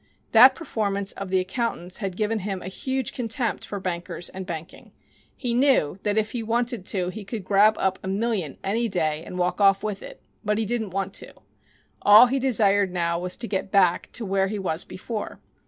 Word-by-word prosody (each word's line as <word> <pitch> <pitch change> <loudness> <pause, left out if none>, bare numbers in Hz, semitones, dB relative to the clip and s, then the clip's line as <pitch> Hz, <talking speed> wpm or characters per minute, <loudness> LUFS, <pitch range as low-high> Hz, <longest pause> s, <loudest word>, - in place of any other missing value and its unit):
That 255 +4 +8
performance 200 - -2
of 195 -1 -6
the 190 0 +2
accountants 185 -2 -3
had 195 -4 -4
given 215 +1 0
him 195 -1 -4
a - - -5
huge 260 +5 -2
contempt 235 0 -2
for 200 - -5
bankers 175 -2 -3
and 190 -1 -8
banking. 165 +1 -8 0.4
He 245 -3 -2
knew 245 - +2
that 205 0 -1
if 215 0 +1
he 240 - -3
wanted 235 -2 -1
to 180 -3 0
he 210 +3 -7
could 210 0 -6
grab 205 +2 +4
up 190 -1 0
a - - -7
million 195 - -1
any 225 +4 0
day 155 -4 -1
and 180 - -8
walk 180 +3 0
off 195 0 +4
with 210 -2 -3
it, - - -10 0.2
but 210 -1 0
he 220 - 0
didn't 220 -1 -2
want 195 +1 -3
to. - - -11 0.7
All 210 +4 +9
he 265 +2 0
desired 205 -7 +2
now 170 -1 -1
was 180 0 -1
to 235 - -1
get 195 -2 -2
back 185 -3 +3
to 235 - -2
where 195 0 +1
he 210 +2 -3
was 180 -4 -2
before. 215 +3 -6
200 Hz, 205 wpm, -24 LUFS, 185-225 Hz, 0.7 s, All